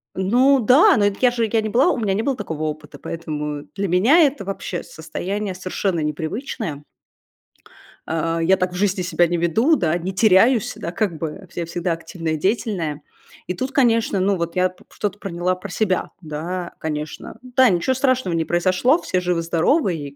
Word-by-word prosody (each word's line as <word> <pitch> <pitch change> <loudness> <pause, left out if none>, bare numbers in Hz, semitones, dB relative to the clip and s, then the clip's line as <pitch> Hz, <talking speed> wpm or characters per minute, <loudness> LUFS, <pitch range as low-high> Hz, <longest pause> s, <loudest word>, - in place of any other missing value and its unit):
Ну 250 +9 +3
да, 285 - +6
но 205 -1 +4
дак 200 +5 -10
я 245 - +6
же 230 -3 -1
я 225 -1 +2
не 215 - -3
была 255 +9 +3
у - - -2
меня 210 -4 0
не 205 - 0
было 270 +2 0
такого 160 -8 -5
опыта, 155 -1 -5
поэтому 150 -3 -5
для 200 0 -1
меня 215 - +4
это 280 -9 +2
вообще 195 -2 -4
состояние 190 +5 -5
совершенно 185 -1 -2
непривычное. 155 - -4 1.2
А, 165 +1 -1
я 185 +3 +4
так 185 -1 -1
в - - -7
жизни 190 0 0
себя 175 -1 +2
не 175 +1 -1
веду, 220 - +3
да, 170 - 0
не 180 +3 -4
теряюсь, 220 +3 +4
да, 170 - -5
как 180 -4 -1
бы, 160 - -3
э, 190 - -14
я 170 - -2
всегда 170 +1 -2
активная 165 0 -4
и - - -1
деятельная. 180 -6 -1 0.5
И - - -1
тут, 260 +7 -3
конечно, 230 -7 +2
ну, 195 +1 +2
вот 170 0 -3
я 185 0 +3
п 180 - -20
что-то 205 -1 -4
проняла 180 -1 -1
про 185 +2 -9
себя. 185 -1 -1
Да, 170 +3 -5
конечно. 150 -1 -5
Да, 255 -1 +3
ничё 180 +8 +1
страшного 255 -9 +1
не 165 -1 0
произошло, 185 - +2
все 185 - -1
живы-здоровы, 175 - +1
и 145 -2 -7
185 Hz, 190 wpm, -21 LUFS, 165-220 Hz, 1.2 s, да